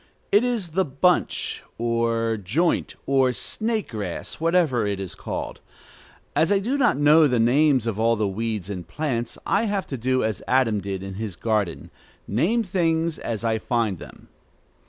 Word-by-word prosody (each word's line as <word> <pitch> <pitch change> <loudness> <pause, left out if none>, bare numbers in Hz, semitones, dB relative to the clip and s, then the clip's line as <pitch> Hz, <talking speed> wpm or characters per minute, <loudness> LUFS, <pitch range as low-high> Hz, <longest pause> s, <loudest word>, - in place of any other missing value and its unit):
It 205 +3 +5
is 235 -8 -1
the 190 +4 +1
bunch, 170 +4 0 0.2
or 115 -1 0
joint, 115 - 0
or 135 -2 +3
snake 220 - -2
grass, 100 -6 -5
whatever 165 -9 +2
it 100 -1 -2
is 95 -2 -5
called. - - -5 0.8
As 160 - +3
I 200 - +5
do 230 +8 -1
not 260 - +3
know 150 +2 +6
the 125 -3 +1
names 130 +2 +4
of 110 -2 -2
all 115 +1 +3
the 105 -2 0
weeds 105 -1 -3
and 90 -5 -6
plants, 120 - -2
I 205 +4 +2
have 200 -3 -1
to 135 - -5
do 130 +2 +1
as 110 -3 -2
Adam 115 -5 +2
did 95 0 -4
in 95 0 -6
his 105 -5 -4
garden, 105 -4 -1 0.4
name 190 - +1
things 170 -4 0
as 115 -2 -4
I 110 -1 +1
find 110 -6 -1
them. - - -13
125 Hz, 170 wpm, -24 LUFS, 110-165 Hz, 0.8 s, know